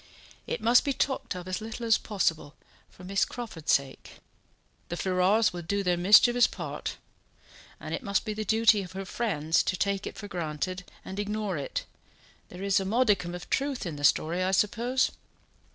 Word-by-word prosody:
It - - -3
must 235 +2 +5
be 280 - 0
talked 265 -7 -1
of 180 0 -7
as 185 +3 -3
little 225 +2 -6
as 225 -1 +4
possible, 165 -8 -1 0.3
for 180 - -16
Miss 195 +2 +1
Crawford's 220 -11 -4
sake. 140 -1 -1 0.8
The 175 - -3
Ferrars 190 +4 +2
will 175 - -5
do 200 +4 -1
their 180 -1 +2
mischievous 220 +7 +6
part; - - -6 0.8
and - - -6
it - - -2
must 200 -3 -1
be 215 - -2
the 215 +1 -3
duty 220 0 +4
of 185 -1 -9
her 195 +1 -5
friends 165 -7 0
to 185 - -1
take 200 0 -1
it - - -8
for 205 - -7
granted 180 +1 -4 0.2
and 190 +2 -6
ignore 205 -2 -2
it; 140 -2 -4 0.6
there 180 +2 -8
is 200 -1 +3
a - - -2
modicum 200 -4 +1
of 180 - -8
truth 275 -4 -1
in 165 -4 -4
the 145 - -8
story, 165 +4 +2
I 185 - +1
suppose?" 235 +6 +1
195 Hz, 185 wpm, -28 LUFS, 180-220 Hz, 0.8 s, mischievous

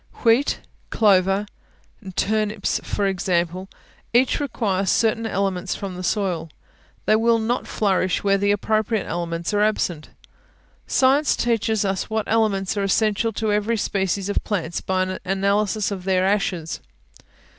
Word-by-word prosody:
Wheat, 235 +4 +3 0.3
clover, 195 -1 +3 0.7
turnips, 215 0 0
for 205 - -1
example, 185 -1 -1 0.4
each 250 +2 +3
require 205 -8 -1
certain 225 +2 +2
elements 190 -2 -1
from 195 -2 -6
the 180 - -6
soil; 185 -3 -1 0.6
they 215 - +4
will 230 +1 +3
not 230 +2 -1
flourish 190 -3 0
where 200 -1 +3
the 200 +1 +1
appropriate 215 +1 +1
elements 170 +2 -3
are 205 - +2
absent. 180 -7 0 0.8
Science 275 +3 +3
teaches 220 -3 0
us 195 -1 -2
what 220 0 0
elements 210 -3 +1
are 200 - -1
essential 215 +2 +1
to 215 0 -1
every 210 +2 +1
species 195 -1 -1
of 205 - -1
plants 175 -5 -2
by 185 0 0
an 185 0 -4
analysis 200 +2 0
of 190 -2 -5
their 185 0 +2
ashes. 185 -5 -1
200 Hz, 135 wpm, -22 LUFS, 185-220 Hz, 0.8 s, they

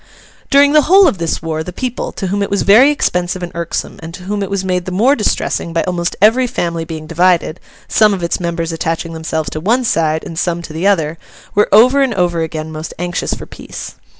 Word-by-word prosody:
During 280 0 +5
the 305 - +6
whole 375 +5 +6
of 205 - 0
this 165 -1 -2
war, 160 -1 -2
the 180 - -6
people, 250 +5 -4
to 195 - -5
whom 200 +2 -1
it 200 - -1
was 200 -1 0
very 230 +8 +6
expensive 180 -10 -1
and 175 - -5
irksome, 170 0 -4
and 165 +1 -8
to 180 - -11
whom 205 +2 -3
it 195 - -3
was 200 -1 -2
made 180 -1 -1
the 185 - -5
more 235 +10 +3
distressing 190 -6 -1
by 165 - +1
almost 175 -1 -2
every 230 +5 +4
family 170 -6 -3
being 160 -1 -7
divided—some 180 +5 +1
of 190 -3 -3
its 170 - -1
members 170 -1 -2
attaching 165 +1 -3
themselves 160 -2 -3
to 155 - -4
one 230 +10 +1
side 160 -7 0
and 165 - -6
some 170 -1 -1
to 160 - -9
the 165 +5 0
other—were 165 +3 -1
over 250 +7 +6
and 260 -5 +1
over 175 -2 0
again 160 -1 -4
most 155 +1 -7
anxious 175 +1 -2
for - - -9
peace. - - -9
180 Hz, 220 wpm, -16 LUFS, 165-205 Hz, -, the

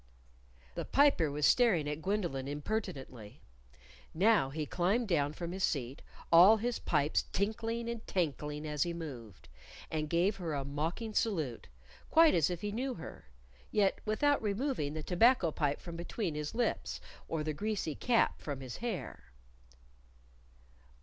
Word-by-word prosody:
The - - -4
Piper 275 - +3
was 145 +1 0
staring 205 -12 +4
at 150 +1 -3
Gwendolyn 175 -9 -2
impertinently. 140 - -5 0.8
Now 200 -5 +4
he 150 +2 -3
climbed 195 - 0
down 145 -6 +1
from 170 +1 -5
his 190 +1 -4
seat, 135 -1 -1 0.3
all 180 +6 +8
his 240 +2 -2
pipes 145 +2 +1
tinkling 225 +3 -2
and 235 -1 -5
tankling 150 -3 -2
as 150 -1 -3
he 170 +1 +1
moved, 125 - -8 0.4
and 155 -1 -2
gave 175 +5 +2
her 165 -5 -3
a 140 -1 -3
mocking 160 +10 -3
salute, 160 - -1 0.4
quite 325 -1 +6
as 160 -1 +3
if 175 -1 -4
he 205 - -3
knew 255 +4 -2
her 165 - -10 0.5
yet 200 -2 +2
without 285 +7 +2
removing 210 - -1
the 155 - -4
tobacco 185 - +4
pipe 145 -2 -1
from 170 -1 -8
between 175 +1 -3
his 150 +5 -4
lips, 240 0 -1 0.3
or 160 -2 -2
the 155 0 -2
greasy 205 -2 -2
cap 235 - +1
from 145 -3 -5
his 130 -2 -7
hair. 185 - -5
170 Hz, 150 wpm, -32 LUFS, 150-220 Hz, 0.8 s, all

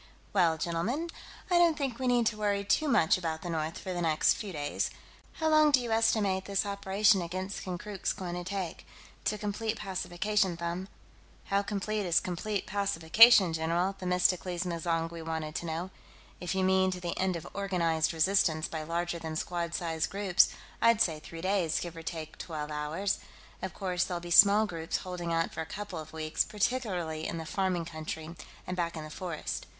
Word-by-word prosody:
"Well, 170 -5 +3
gentlemen, 210 - -2 0.4
I 350 - +5
don't 335 -3 +4
think 270 -5 -2
we 260 - -1
need 240 -2 +3
worry 205 -1 0
too 310 +9 +2
much 185 - +4
about 160 -2 -3
the 175 - -3
north, 160 0 -2
for 185 - -5
the 175 - -2
next 160 -2 +3
few 205 -3 -6
days. 145 -3 -2 0.4
How 320 - -1
long 310 -1 +6
do 280 -3 +5
you 240 -2 -4
estimate 215 -4 +2
this 200 +1 0
operation 200 0 +3
against 185 +3 -4
Konkrook's 190 +2 -3
going 180 -2 -5
to 175 0 -4
take, 185 -2 -5 0.4
to 210 - +1
complete 215 +2 -2
pacification, 195 0 0
Them?" 170 +2 -4 0.6
"How 200 0 +1
complete 205 0 -2
is 170 - +4
complete 190 +3 -3
pacification, 200 0 +6
general?" 170 +4 0
Themistocles 180 -1 +1
M'zangwe 165 -1 -2
wanted 160 -1 -3
to 170 - -4
know. 165 +4 -3 0.5
"If 180 +1 -3
you 190 - +1
mean 190 0 +4
to 185 -1 -3
the 175 -1 -3
end 185 -1 +1
of 170 0 -6
organized 170 -5 +1
resistance 165 -1 +2
by 160 - -4
larger 170 +2 -2
than 160 -1 -5
squad 170 +1 -2
size 165 -2 -1
groups, 195 -2 +3 0.3
I'd 230 -1 +5
say 160 -7 +2
three 165 +2 -9
days, 185 -3 +1
give 175 -1 -6
or 165 - -7
take 160 -1 -6
twelve 155 -3 -5
hours. 155 +7 -1 0.4
Of 190 - -5
course, 180 -2 0
there'll 180 -2 -3
be 175 0 -8
small 205 +4 +8
groups 165 -4 -3
holding 180 -2 -5
out 165 0 0
for 160 - -4
a - - -4
couple 205 -3 -6
of 155 0 -9
weeks, 155 -1 0
particularly 190 -8 -1
in 170 - -3
the 160 - -5
farming 185 -1 -1
country 160 0 -6 0.3
and 180 - -3
back 170 -2 -2
in 155 - -5
the 155 - -9
forest...." 170 -1 -5
180 Hz, 185 wpm, -30 LUFS, 165-200 Hz, 0.6 s, small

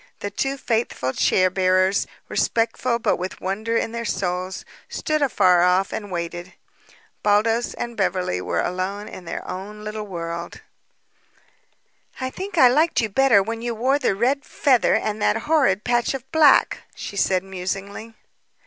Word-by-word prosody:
The 205 - -4
two 270 +6 -2
faithful 225 - -1
chair 185 -1 +2
bearers, 185 +1 +2 0.2
respectful 235 +1 0
but 235 - 0
with 185 +1 -5
wonder 215 +5 -2
in 225 - -1
their 235 0 -4
souls, 185 -2 -3 0.2
stood 310 -1 -1
afar 185 -10 +4
off 180 +2 +2
and 205 -2 -5
waited. 175 0 -5 0.7
Baldos 225 +3 +2
and 235 0 -5
Beverly 185 - -1
were - - -1
alone 190 +3 -3
in 185 - -10
their - - -6
own 210 +3 -7
little 215 0 -5
world. 170 -2 -6 1.6
"I 260 0 -3
think 380 +2 -6
I 260 - +8
liked 305 +7 +3
you 220 - 0
better 230 -2 +4
when 225 +2 -5
you 235 -1 -3
wore 260 +5 +1
the 195 - +1
red 260 +7 +1
feather 260 -6 +2
and 215 0 -2
that - - +2
horrid 270 -11 +2
patch 240 +2 +1
of 265 -1 -7
black," 310 -4 +5 0.2
she - - -7
said 190 -2 +1
musingly. 195 +4 -6
210 Hz, 155 wpm, -22 LUFS, 185-240 Hz, 1.6 s, I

